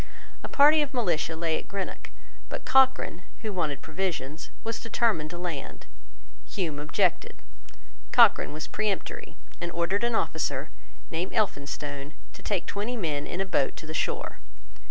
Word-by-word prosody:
A - - -3
party 300 +2 +7
of 290 -2 -2
militia 170 -8 +1
lay 160 -1 +1
at - - -11
Greenock: 195 -1 -4 0.4
but - - -5
Cochrane, 265 -9 +4 0.2
who 215 -2 -2
wanted 155 -6 -1
provisions, 160 -3 -3
was 230 0 -2
determined 220 -8 +1
to 175 - -6
land. 175 -5 -5 0.6
Hume 160 -7 -2
objected. 150 - +1 0.8
Cochrane - - +6
was 155 +1 -4
peremptory, 210 -3 -2 0.3
and 175 0 -2
ordered 175 +5 +1
an 235 -1 +2
officer, - - 0 0.4
named 170 +3 -2
Elphinstone, 145 -6 -1 0.2
to - - -12
take 200 -4 -1
twenty 215 +5 -2
men 150 -7 -1
in 180 - -2
a - - +1
boat 145 -7 +1
to - - -8
the 155 - -5
shore. - - -1
175 Hz, 150 wpm, -28 LUFS, 155-215 Hz, 0.8 s, party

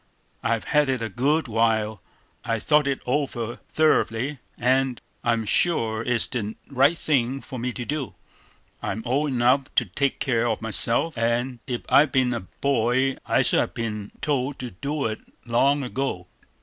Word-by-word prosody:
I've 115 -1 0
had 150 -2 +2
it 130 -3 0
a 115 - -2
good 140 +9 +1
while, 110 -2 +1 0.4
I've 115 -2 -2
thought 150 -2 +3
it 140 -1 -1
over 125 -4 -2
thoroughly, 140 -3 +1 0.2
and 130 0 +1 0.2
I'm 115 -2 +1
sure 110 -4 +1
it's 120 -1 +1
the 110 -4 -3 0.2
right 140 +5 +4
thing 135 -4 0
for 130 -2 -8
me 125 +2 -2
to 120 - -5
do. 145 -2 -3 0.7
I'm 110 +3 -3
old 140 +5 +1
enough 130 +1 +3
to 120 - +4
take 135 +8 -1
care 120 -3 +1
of 110 -2 0
myself; 115 +7 +2
and 120 +2 0
if 125 -2 -2
I'd 145 -1 +5
been 125 -1 +2
a 120 - -2 0.2
boy, 130 0 +2
I - - +3
should - - +3
have - - -1
been 105 -3 -4
told 140 -2 -1
to 125 -1 -6
do 140 +10 -3
it 110 -1 -2 0.3
long 135 +4 +2
ago. 125 -8 -3
125 Hz, 165 wpm, -24 LUFS, 115-140 Hz, 0.7 s, I'd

